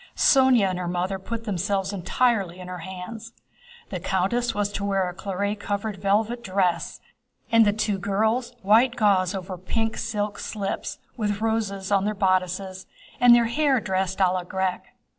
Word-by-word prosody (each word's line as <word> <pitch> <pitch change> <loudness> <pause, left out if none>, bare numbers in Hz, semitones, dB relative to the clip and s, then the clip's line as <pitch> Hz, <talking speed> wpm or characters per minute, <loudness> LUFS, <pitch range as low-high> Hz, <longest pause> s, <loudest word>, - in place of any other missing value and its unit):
Sónya 260 -6 +5
and 180 - -4
her 180 - -3
mother 180 +2 -2
put 230 +4 -5
themselves 195 -1 -1
entirely 195 -1 0
in 180 - -8
her 180 -1 -6
hands. 190 +6 -8 0.6
The 185 - -4
countess 195 +7 0
was 205 0 0
to 200 - -4
wear 195 -2 +1
a 180 - -5
claret 200 +2 -3
colored 205 0 -3
velvet 215 +5 0
dress, 185 -3 0 0.5
and 230 -1 +6
the - - +5
two 210 -1 -1
girls 220 +6 0
white 230 +5 +4
gauze 200 -4 +2
over 185 -1 -6
pink 225 +5 -2
silk 210 -2 -3
slips, 200 -3 -4 0.2
with 205 -3 -1
roses 215 -3 -1
on 200 -1 +3
their 210 0 -1
bodices 185 0 -1 0.3
and 245 -1 +8
their 235 -1 +4
hair 270 +2 +2
dressed 190 -2 -1
à 185 -2 +3
la 185 -1 -2
grecque. 190 0 -2
200 Hz, 165 wpm, -25 LUFS, 185-225 Hz, 0.6 s, and